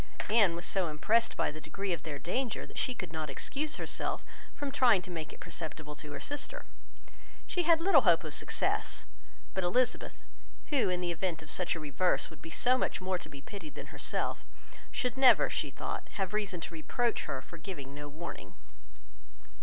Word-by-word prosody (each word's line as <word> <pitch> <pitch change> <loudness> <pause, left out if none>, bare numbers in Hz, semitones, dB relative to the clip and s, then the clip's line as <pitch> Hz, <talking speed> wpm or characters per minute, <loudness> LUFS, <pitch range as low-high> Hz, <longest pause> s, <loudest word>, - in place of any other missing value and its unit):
Anne 205 -7 +6
was 170 +1 -4
so 190 -3 +1
impressed 215 +10 +2
by - - +2
the 155 +1 -9
degree 190 +4 -2
of 165 - -3
their 155 -3 -4
danger, 240 - -1
that - - -6
she 255 - 0
could 180 -7 -5
not 155 -2 -3
excuse 290 - -1
herself - - -1 0.3
from 285 -1 -3
trying 240 -7 +6
to 180 0 -8
make 160 -3 -4
it - - -12
perceptible 155 -1 -6
to 150 0 -8
her - - -5
sister. 290 - -4 0.8
She 360 - 0
had 335 -1 +5
little 330 -5 +6
hope 175 -7 +5
of 155 -2 -3
success; - - +1 0.5
but 190 - 0
Elizabeth, 250 +8 +1 0.5
who 275 -9 +4
in 180 0 0
the 175 -1 0
event 170 -1 -2
of 160 - -4
such 180 -1 +1
a - - -4
reverse 155 +5 +1
would 160 -1 -13
be - - -8
so 250 +9 +3
much - - 0
more 185 -1 -1
to 155 - -9
be 140 -2 -9
pitied 160 -2 -8
than - - -8
herself, - - -1 0.5
should 250 -2 -1
never, 265 -2 +7
she - - 0
thought, - - -4
have 195 -1 -2
reason 205 -4 -1
to 170 - -6
reproach 230 +9 0
her 140 -3 -2
for 170 +5 -11
giving 150 -6 -6
no 145 0 -6
warning. 160 +4 -7
180 Hz, 195 wpm, -32 LUFS, 155-235 Hz, 0.8 s, never